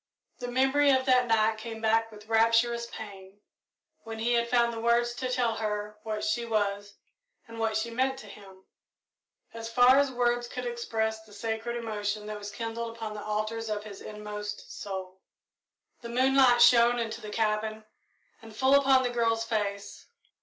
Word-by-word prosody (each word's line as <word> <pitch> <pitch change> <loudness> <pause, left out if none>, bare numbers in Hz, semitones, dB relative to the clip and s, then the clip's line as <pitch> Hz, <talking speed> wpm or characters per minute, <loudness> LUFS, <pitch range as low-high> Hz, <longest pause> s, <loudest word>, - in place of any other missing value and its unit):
The 245 - -5
memory 270 +3 +3
of 260 -1 +3
that 250 -2 +4
night 220 -1 +2
came 225 0 -7
back 225 0 +1
with 210 0 -13
rapturous 230 +1 +2
pain 200 -3 -10 0.6
when 225 0 -7
he 235 +2 0
had 235 0 +1
found 235 -1 +2
the 225 - -5
words 235 +1 +2
to 255 +1 -4
tell 240 -3 0
her 210 -1 -4
what 215 -1 -4
she 215 +3 0
was 205 -2 -2 0.5
and 230 0 -10
what 220 -1 0
she 230 +2 -3
meant 260 +3 0
to 240 - -10
him, 195 -2 -14 0.9
as 230 0 -6
far 250 +3 +6
as 280 -1 +2
words 240 -1 0
could 250 +1 -6
express 220 -2 -2
the 215 -1 -18
sacred 225 +2 -3
emotion 210 -2 -3
that 210 0 -6
was 205 0 -7
kindled 230 +2 -5
upon 225 -2 -5
the 210 - -7
altars 215 +1 -3
of 210 -1 -3
his 205 -2 -10
inmost 210 -1 -7
soul. 190 -1 -7 0.8
The 235 - -8
moonlight 255 0 +5
shone 240 0 +6
into 225 -2 -3
the 215 - -7
cabin 215 0 -1 0.6
and 225 -1 -13
full 265 +4 +3
upon 270 -2 +5
the 245 - -1
girl's 230 -1 +1
face. 205 -3 -3
225 Hz, 175 wpm, -28 LUFS, 215-240 Hz, 0.9 s, far